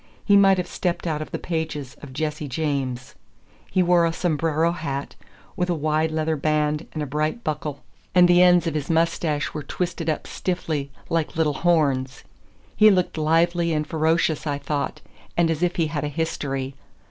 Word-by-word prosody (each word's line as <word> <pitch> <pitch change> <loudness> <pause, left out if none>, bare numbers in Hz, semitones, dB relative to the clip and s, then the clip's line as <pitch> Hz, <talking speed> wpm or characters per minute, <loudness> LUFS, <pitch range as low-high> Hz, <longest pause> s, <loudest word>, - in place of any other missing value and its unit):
He 205 - +5
might 195 -1 +6
have 180 - -1
stepped 175 -1 -2
out 155 -3 -1
of 155 - -6
the - - -3
pages 155 -5 -4
of 145 - -10
"Jesse 150 +1 -3
James." 130 -3 -2 0.6
He 185 - +2
wore 175 -1 +4
a 165 - +2
sombrero 165 -1 +1
hat, 140 -5 -4 0.4
with 180 0 -1
a 175 - +1
wide 155 +1 +1
leather 155 0 0
band 150 +1 0
and 155 - -3
a - - -2
bright 155 - -2
buckle, 150 -1 -4 0.3
and 180 -1 +7
the 175 0 +5
ends 180 -1 +6
of 165 - -1
his 150 -2 -3
mustache 165 -2 0
were 150 - -4
twisted 170 +2 -3
up 155 - -2
stiffly, 160 -6 -3 0.2
like 165 -2 -1
little 160 -2 +2
horns. 140 -5 +1 0.5
He 215 0 +7
looked 185 -3 +2
lively 165 +2 +2
and 150 0 0
ferocious, 160 0 +1
I 145 -1 0
thought, 145 0 -3 0.4
and 170 -1 +3
as 160 0 -2
if 180 0 +1
he 170 -4 +2
had 150 -1 -3
a - - 0
history. 140 -3 -3
155 Hz, 180 wpm, -23 LUFS, 150-170 Hz, 0.6 s, and